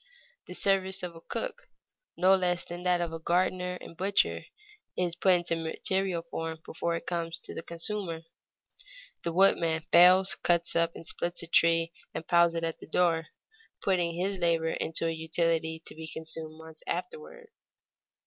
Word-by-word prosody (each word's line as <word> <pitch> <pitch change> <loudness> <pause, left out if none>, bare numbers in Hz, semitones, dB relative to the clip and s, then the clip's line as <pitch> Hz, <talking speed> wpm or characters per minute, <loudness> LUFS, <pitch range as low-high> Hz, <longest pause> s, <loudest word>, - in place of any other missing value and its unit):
The - - -7
service 190 -1 +1
of 170 -2 -7
cook - - -4 0.5
no 185 +2 +5
less 180 -2 +1
than 175 +1 -7
that 180 -1 +2
of 165 -1 -4
gardener 180 +1 +1
and - - -11
butcher, 195 +3 +1 0.5
is 175 -2 0
put 185 +1 +4
into 175 -1 +1
material 170 +2 -1
form 165 -1 -5
before 170 +1 -2
it 165 - -5
comes 170 -1 -2
to - - -7
the - - -5
consumer. 170 0 -3 1.0
The 170 - -2
woodman 165 -3 +3
fells, 185 +2 +7
cuts 170 -1 +1
up 170 0 +2
and - - -10
splits 175 +1 -4
a - - -7
tree, 165 0 +3 0.2
and 160 - -5
piles 170 -1 +4
it 165 - -2
at 165 -1 -2
the - - -11
door, 165 -1 +2 0.5
putting 175 -3 +1
his 190 +2 -1
labor 165 -2 +2
into 165 +1 -1
a 165 - +1
utility 160 0 0
to - - -7
be 160 0 -8
consumed 160 0 -5
months 160 -1 -13
afterward. 470 0 -5
170 Hz, 160 wpm, -29 LUFS, 165-180 Hz, 1.0 s, fells